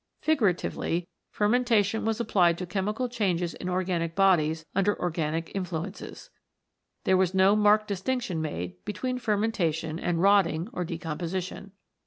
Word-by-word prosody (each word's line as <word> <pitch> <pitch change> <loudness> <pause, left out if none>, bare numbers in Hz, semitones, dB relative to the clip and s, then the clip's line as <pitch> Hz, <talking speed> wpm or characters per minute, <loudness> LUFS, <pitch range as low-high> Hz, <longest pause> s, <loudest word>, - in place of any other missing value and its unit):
Figuratively, 185 - 0 0.2
fermentation 220 -1 +2
was 225 0 0
applied 180 -7 +3
to 180 - -4
chemical 210 +7 -2
changes 185 -8 -1
in 180 - -5
organic 180 -2 -1
bodies 160 -5 +3
under 200 +1 +1
organic 165 -1 -2
influences. 185 0 -5 0.7
There 190 - +3
was 185 0 +1
no 190 +2 +5
marked 210 0 +4
distinction 200 -3 -2
made 90 - -5
between 250 +5 -3
fermentation 175 -8 -1
and 175 -2 -1
rotting 195 -2 +3
or 180 - -2
decomposition. 175 +3 -5
185 Hz, 125 wpm, -27 LUFS, 170-210 Hz, 0.7 s, no